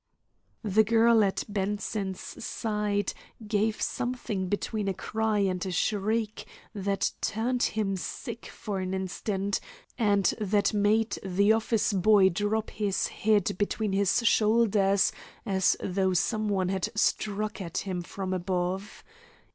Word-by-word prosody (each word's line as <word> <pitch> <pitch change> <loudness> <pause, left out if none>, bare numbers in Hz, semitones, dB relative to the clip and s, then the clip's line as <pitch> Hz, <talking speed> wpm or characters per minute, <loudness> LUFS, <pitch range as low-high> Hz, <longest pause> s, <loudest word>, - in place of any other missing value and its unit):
The 215 +1 +4
girl 225 0 +5
at 195 -1 0
Bronson's 200 -1 -3
side 210 -2 -1 0.3
gave 215 +1 0
something 220 -7 -2
between 205 +1 -2
a 195 - -1
cry 220 +1 -1
and 185 -2 0
a 190 - -3
shriek 215 +3 -1 0.3
that 195 -1 -1
turned 240 +3 -1
him 210 -3 0
sick 230 +5 -6
for 205 -4 -5
an 185 0 -2
instant, 195 +1 -2 0.4
and 205 -3 +3 0.2
that 205 +1 +2
made 215 +2 +2
the 200 +3 +3
office 225 -1 +1
boy 195 0 +5
drop 205 +4 -1
his 205 -3 -1
head 210 -4 +1
between 205 0 -1
his 200 +4 +2
shoulders 210 -3 +3 0.3
as 190 -3 +2
though 190 0 0
some 215 +4 0
one 190 -3 +1
had 190 +2 -1
struck 215 -1 0
at 170 -3 -5
him 185 -3 -2
from 190 +2 -4
above. 185 +2 -2
205 Hz, 130 wpm, -28 LUFS, 190-215 Hz, 0.4 s, girl